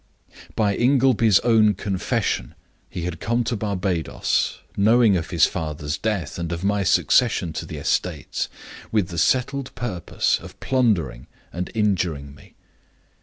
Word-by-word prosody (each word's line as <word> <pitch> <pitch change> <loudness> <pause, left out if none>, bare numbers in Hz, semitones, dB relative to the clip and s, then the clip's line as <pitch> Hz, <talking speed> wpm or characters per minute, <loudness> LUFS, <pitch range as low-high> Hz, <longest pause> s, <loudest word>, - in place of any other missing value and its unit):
"By 105 -2 +1
Ingleby's 125 -5 +4
own 110 -3 +4
confession, 95 -1 -2 0.3
he 90 - -5
had 90 -1 -4
come 120 +1 0
to 120 - -2
Barbadoes 95 -6 -1 0.2
knowing 110 +1 +4
of 80 -3 -2
his - - +4
father's 75 -1 -3
death 90 -4 -3
and 85 0 -3
of 85 +1 -4
my 100 0 +1
succession 95 -2 +2
to - - -5
the - - -7
estates - - -2 0.4
with 105 -6 +1
the 85 - -3
settled 130 - 0
purpose 95 -9 -1
of - - -13
plundering 105 - 0 0.3
and 90 +1 -4
injuring 90 -10 0
me. 70 - -18
100 Hz, 135 wpm, -23 LUFS, 85-115 Hz, 0.4 s, Ingleby's